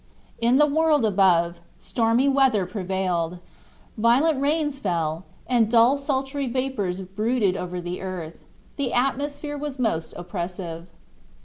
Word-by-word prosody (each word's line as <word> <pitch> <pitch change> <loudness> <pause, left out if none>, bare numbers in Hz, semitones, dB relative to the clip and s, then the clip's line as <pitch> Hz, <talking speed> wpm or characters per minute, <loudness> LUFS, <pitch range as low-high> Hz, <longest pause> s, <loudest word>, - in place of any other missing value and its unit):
In 235 +2 +3
the 300 - +6
world 300 -3 +2
above, 175 -4 +2 0.2
stormy 230 +3 +1
weather 265 -8 +3
prevailed. 180 -3 -2 0.6
Violent 265 +7 +3
rains 295 -1 0
fell, 165 - -2 0.2
and 235 -4 +2
dull 235 +3 +5
sultry 275 0 -1
vapors 235 -8 -2
brooded 205 +1 0
over 180 -1 -4
the 175 +1 -5
earth; 180 -4 -6 0.3
the 275 -4 -2
atmosphere 285 +3 -1
was 290 -2 -5
most 215 -10 -1
oppressive. 175 -1 -5
225 Hz, 120 wpm, -24 LUFS, 180-270 Hz, 0.6 s, the